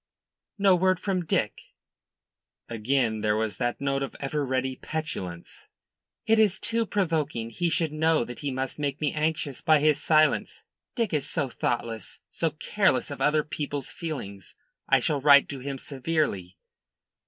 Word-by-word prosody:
"No 195 -2 +5
word 185 0 +2
from 185 -3 -1
Dick?" 110 -8 -2 0.9
Again 115 -1 0
there 105 0 +2
was 110 -1 -1
that 120 -1 -1
note 140 0 0
of 135 - -4
ever 145 +1 -2
ready 130 -1 -1
petulance. 95 - -6 0.6
"It 225 0 +4
is 210 -3 +4
too 230 -1 0
provoking. 155 - -1
He 170 +9 0
should 160 -2 +1
know 155 -3 +2
that 125 - -8
he 145 - -3
must 130 +1 -3
make 145 0 -2
me 150 -2 0
anxious 155 -3 -1
by 155 -2 +5
his 150 0 +3
silence. 155 -1 +2 0.3
Dick 230 -7 -1
is 150 -3 0
so 135 - -1
thoughtless 115 -3 -3
so 165 - -1
careless 185 +3 0
of 140 - -6
other 150 0 +3
people's 145 -3 -4
feelings. 100 - -7 0.3
I - - +6
shall 145 -3 -1
write 140 0 +7
to 140 - -5
him 135 +1 -5
severely." 130 - -2
145 Hz, 155 wpm, -27 LUFS, 130-160 Hz, 0.9 s, write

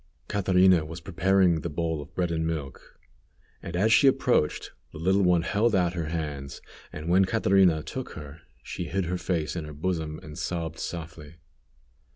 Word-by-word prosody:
Catrina 95 -3 +4
was 80 +2 -7
preparing 95 -1 +2
the 85 - -4
bowl 80 0 -2
of 75 - -13
bread 90 -2 0
and 80 -1 -1
milk, 75 -5 -6 0.6
and 85 - -6
as 110 +5 +3
she 140 - +6
approached, 130 - +1 0.2
the - - -10
little 95 +5 +2
one 90 -3 +3
held 110 +3 +1
out 90 -2 +2
her 85 -3 -3
hands, 75 -4 -4 0.3
and 75 +2 -7
when 95 +3 +4
Catrina 95 -6 +3
took - - -6
her 75 +2 -10 0.2
she - - -5
hid 95 0 -2
her 90 +2 -2
face 85 -4 -2
in 85 - -3
her 75 - -8
bosom 80 -1 -3
and 75 0 -9
sobbed 80 -2 -3
softly. 80 -2 -7
85 Hz, 175 wpm, -27 LUFS, 80-95 Hz, 0.6 s, she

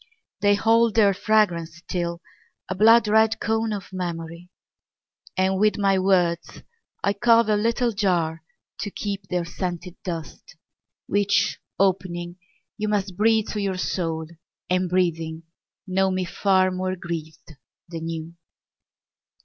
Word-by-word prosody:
They 205 0 +4
hold 225 +2 +3
their 205 -3 +5
fragrance 180 -6 +1
still, 170 0 -4 0.5
a - - -2
blood 225 +3 +6
red 220 +1 +3
cone 225 0 0
Of 200 -2 -6
memory. 170 -1 -5 0.9
And 190 0 +2
with 215 +1 +3
my 195 -2 +2
words 180 -3 +1 0.4
I 200 - +2
carve 230 +1 +4
a 210 - +4
little 230 +3 +1
jar 175 -6 0 0.4
To 205 - -3
keep 200 -1 -5
their 180 -2 -1
scented 175 0 -5
dust, 165 -5 -7 0.5
Which, 200 0 +1 0.2
opening, 180 -2 0 0.4
you 215 - -1
must 200 -3 -1
Breathe 220 +2 +2
to 210 - -3
your 195 -2 -1
soul, 165 -3 -2 0.5
and, 185 0 +1
breathing, 165 -3 -1 0.4
know 190 0 +1
me 185 -1 -1
far 185 +1 +2
More 185 0 -2
grieved 165 -3 -7 0.3
than 165 -1 -5
you. 165 0 -5
185 Hz, 130 wpm, -24 LUFS, 170-205 Hz, 0.9 s, blood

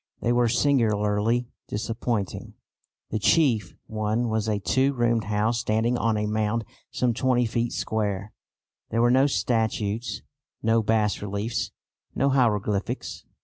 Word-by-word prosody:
They 120 - 0
were 120 0 +3
singularly 115 -2 +2 0.2
disappointing. 110 -1 -3 0.6
The 110 - -1
chief 115 - +2
one 110 +2 -1
was 110 0 -1
a 105 - +1
two 130 +10 +1
roomed 120 -4 +1
house 105 +3 0
standing 110 +2 +1
on 115 -2 +1
a 105 - 0
mound 110 +1 0 0.2
some 125 -2 0
20 125 +1 +2
feet 115 +1 -1
square. 105 -2 -2 0.6
There 115 +1 +1
were 120 - +4
no 130 +2 +5
statues, 110 0 -1 0.4
no 115 0 +3
bas 105 -1 +1
reliefs, 105 +4 -2 0.5
no 140 - +2
hieroglyphics. 105 -6 0
110 Hz, 130 wpm, -25 LUFS, 105-120 Hz, 0.6 s, no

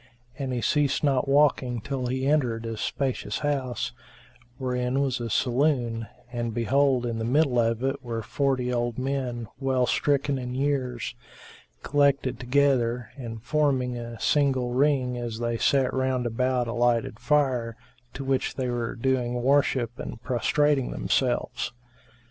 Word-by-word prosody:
And 135 -2 -2
he 125 -1 -1
ceased 145 +4 +1
not 135 -2 +2
walking 135 -4 +3
till 130 +2 -3
he 130 +1 -1
entered 125 -6 +1
a 115 0 -3
spacious 130 +4 -2
house, 130 -4 -1 0.7
wherein 125 0 -1
was 135 -3 0
a 120 -1 -3
saloon 120 -2 +1 0.3
and 120 -2 -3
behold, 130 +1 +2
in 115 -1 -2
the - - -2
middle 130 +1 +2
of 115 +1 +1
it 135 +1 -1
were 115 -2 -4
forty 130 -1 0
old 120 -1 -1
men, 130 -3 -2
well 130 -2 +2
stricken 140 0 +1
in 125 0 -5
years, 130 -5 -1 0.7
collected 140 -3 +2
together 125 -2 +1
and 115 -5 -7
forming 135 -4 +1
a 120 -1 -7
single 130 -4 +2
ring 130 -2 +2
as 120 -2 -4
they 120 0 -2
sat 135 -2 +2
round 130 -1 0
about 125 +2 0
a 115 - -3
lighted 120 0 +1
fire, 130 -6 +1 0.4
to 135 - -4
which 135 -1 0
they 130 -2 -2
were 120 -1 -2
doing 125 -1 0
worship 130 -3 +2
and 115 - -7
prostrating 140 +2 +1
themselves. 125 -1 -1
125 Hz, 145 wpm, -26 LUFS, 120-135 Hz, 0.7 s, walking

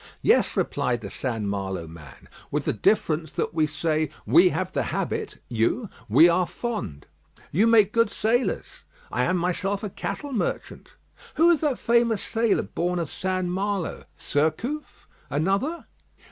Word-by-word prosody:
"Yes," - - +3
replied 120 -1 0
the 100 - -7
St. 115 -5 -3
Malo 95 -3 -3
man, 80 -2 -13 0.2
"with - - -2
the - - +1
difference 160 - +1
that - - -2
we 155 -2 +2
say, 155 0 -1 0.2
'We 360 +2 +6
have - - -2
the - - 0
habit,' 440 -2 -3
you, 125 - 0 0.2
'We 165 - +7
are 175 +1 +2
fond.'" 105 - -5 0.5
"You 205 +9 +3
make 215 -3 +5
good 230 -1 +3
sailors." 235 +5 0 0.5
"I - - +1
am 185 - +1
myself 185 +3 -1
a 205 - -4
cattle 285 +7 -5
merchant." 225 - -3 0.4
"Who 330 +3 +5
was 340 -3 +3
that 295 -5 +1
famous 235 -3 +2
sailor 225 -2 +1
born 180 +1 -2
of 165 -4 -3
St. 185 -1 -1
Malo?" 195 0 -2
"Surcouf?" 160 - -2 0.2
"Another?" 195 - 0
185 Hz, 150 wpm, -25 LUFS, 155-230 Hz, 0.5 s, We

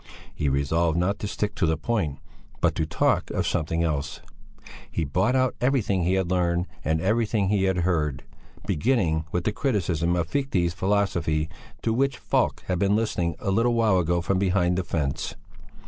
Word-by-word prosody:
He 75 - -1
resolved 80 +5 +1
not 95 +4 0
to 105 - -3
stick 105 +1 -2
to 85 - 0
the 80 0 +1
point, 80 -5 -1 0.4
but - - +2
to 80 - -1
talk - - +1
of - - -1
something 80 +1 0
else. 75 -4 -2 0.7
He 85 - -2
brought 95 - +1
out 130 -2 +2
everything 120 -7 +1
he 90 - +2
had 95 -2 0
learned 90 -1 +1 0.2
and 80 0 +1
everything 105 +1 +1
he 100 -2 +2
had 95 -1 +1
heard, 75 -7 0 0.4
beginning 80 - +1
with 90 - -1
the 110 - +1
Criticism 90 - 0
of 85 -2 0
Fichte's 95 - 0
Philosophy 90 -5 0 0.3
to 115 - +1
which 135 +1 +1
Falk - - 0
had 90 -2 -1
been 100 +1 +3
listening 90 -7 0
a 100 - -2
little 115 +4 +2
while 110 -5 +3
ago 85 0 +1
from 95 +2 0
behind 90 -2 +2
the 95 - 0
fence. 75 -4 -2
90 Hz, 180 wpm, -25 LUFS, 80-105 Hz, 0.7 s, been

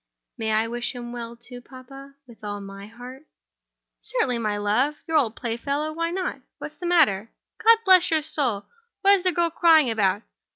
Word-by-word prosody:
"May 220 -1 -3
I 220 +1 +1
wish 240 +2 -4
him 240 -1 -7
well 235 -1 -7
too, 245 +1 -11
papa—with 270 -1 -15
all 205 -1 -5
my 195 0 -10
heart?" 250 +6 -12 0.7
"Certainly, 265 - -1
my 210 -2 -1
love—your 260 - -1
old 240 -8 +2
playfellow—why 290 +7 -3
not? 370 +1 -4 0.2
What's - - -9
the 355 - -5
matter? 245 - +3 0.3
God 455 +1 +7
bless 370 -2 +6
my 320 -1 +1
soul, 275 -9 -1 0.4
what 400 0 +6
is 385 -3 +2
the 365 - +4
girl 340 -1 0
crying 320 -6 +4
about? 205 -1 0
255 Hz, 165 wpm, -24 LUFS, 225-320 Hz, 0.7 s, God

